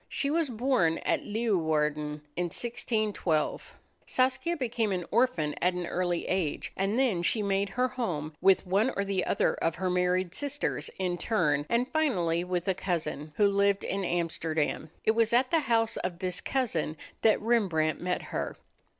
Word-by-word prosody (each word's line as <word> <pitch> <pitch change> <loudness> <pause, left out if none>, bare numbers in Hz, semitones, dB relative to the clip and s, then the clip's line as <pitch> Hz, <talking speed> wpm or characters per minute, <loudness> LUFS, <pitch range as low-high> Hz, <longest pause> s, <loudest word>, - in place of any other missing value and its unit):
She 280 - -1
was 325 -2 +1
born 225 -9 +2
at - - +1
Leeuwarden 155 -9 0
in 175 - 0
1612. 210 -4 -1 0.3
Saskia 260 +6 +1
became 230 -5 -1
an 180 -2 -2
orphan 215 -11 +2
at 180 0 +2
an 180 -1 -2
early 175 0 -1
age, 180 -5 -1
and 195 +4 0
then 240 -10 +2
she 210 +5 +1
made 200 0 +1
her 250 +6 +1
home 170 - -3
with 195 0 +4
one 200 +7 +2
or 200 - 0
the 195 -2 0
other - - +2
of 165 - -1
her 185 +1 -1
married 180 0 +1
sisters 285 0 -2
in 180 -2 -1
turn, 150 -9 +1
and 235 +2 +2
finally 180 - +1
with 180 0 -2
a 190 - +3
cousin, 170 -5 -3
who 205 - +4
lived 200 0 +2
in 195 0 -2
Amsterdam. 160 -3 -1 0.2
It - - +5
was 230 0 +2
at 255 +2 +3
the 330 - +4
house 230 -5 +1
of 180 -1 -3
this 180 -1 -3
cousin 175 - -1 0.2
that 220 - +4
Rembrandt 190 -9 +1
met 180 0 -1
her. - - -4
190 Hz, 165 wpm, -29 LUFS, 170-230 Hz, 0.3 s, It